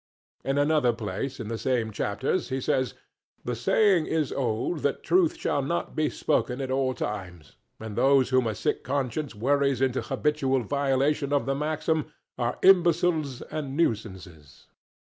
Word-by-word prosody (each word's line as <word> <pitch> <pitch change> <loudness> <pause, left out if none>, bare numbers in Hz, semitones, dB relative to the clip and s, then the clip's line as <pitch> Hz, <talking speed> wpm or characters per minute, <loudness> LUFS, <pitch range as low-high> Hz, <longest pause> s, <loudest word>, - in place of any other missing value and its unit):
In 135 +1 -1
another 145 -4 +3
place 115 +5 -4
in 115 - -5
the 115 0 -4
same 120 -4 0
chapters 120 - -2
he 130 0 -1
says, 130 0 0 0.5
"The 125 - -2
saying 175 - +3
is 155 -4 0
old 125 +5 -1
that 140 -1 -1
truth 350 -2 +2
should 140 - -1
not 170 +5 -2
be 155 -1 +1
spoken 125 +1 -1
at 135 -1 -3
all 130 -1 0
times; 90 -7 -6 0.2
and 110 -2 -7
those 135 0 +4
whom 130 -2 +2
a 110 - -2
sick - - -1
conscience 140 0 -2
worries 140 +3 +1
into 130 -1 +1
habitual 135 -4 0
violation 140 +2 0
of 145 -1 +1
the 135 - 0
maxim 155 +2 -1 0.2
are 120 -1 -2
imbeciles 170 -6 +3
and 145 -3 -4
nuisances." 95 - -3
135 Hz, 155 wpm, -26 LUFS, 120-150 Hz, 0.5 s, those